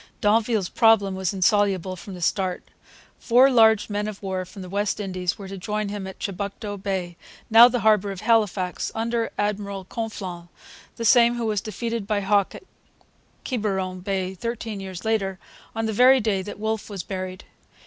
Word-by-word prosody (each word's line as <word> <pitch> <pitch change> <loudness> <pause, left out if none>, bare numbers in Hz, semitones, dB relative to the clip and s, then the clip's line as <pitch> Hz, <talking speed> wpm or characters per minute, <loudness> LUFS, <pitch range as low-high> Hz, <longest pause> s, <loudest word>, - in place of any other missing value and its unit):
D'Anville's 215 -1 +2
problem 220 -4 +3
was 190 -1 -1
insoluble 195 -2 +1
from 185 +2 -9
the 175 - -6
start, 185 +1 0 0.6
Four 255 +3 +5
large 220 -3 +5
men 210 0 -2
of 210 -1 -7
war 190 -1 -3
from 190 +1 -10
the - - -8
West 200 +3 -1
Indies 185 -2 -2
were 200 -2 -8
to 195 0 -7
join 210 +2 -2
him 200 -2 -5
at 190 - -9
Chibucto 200 +1 -5
Bay, 190 -3 -4 0.3
now 230 +2 +10
the 245 -1 -1
harbour 210 -2 +3
of 190 - -7
Halifax, 205 -6 +1
under 230 0 -1
Admiral 200 -2 -2
Conflans, 190 -5 -6 0.5
the 230 - -4
same 235 +1 +5
who 235 -1 -2
was 210 -3 0
defeated 230 0 -4
by 210 -2 0
Hawke 200 0 +1
in - - -11 0.8
Quiberon 190 -6 -2
Bay 190 0 -2
thirteen 225 +1 -5
years 190 0 -7
later, 195 -4 0 0.4
on 225 0 -1
the 220 - -1
very 255 +4 +6
day 210 -4 0
that 200 +2 -8
Wolfe 220 +1 -3
was 195 -4 -5
buried. 185 0 -6
205 Hz, 175 wpm, -24 LUFS, 190-220 Hz, 0.8 s, now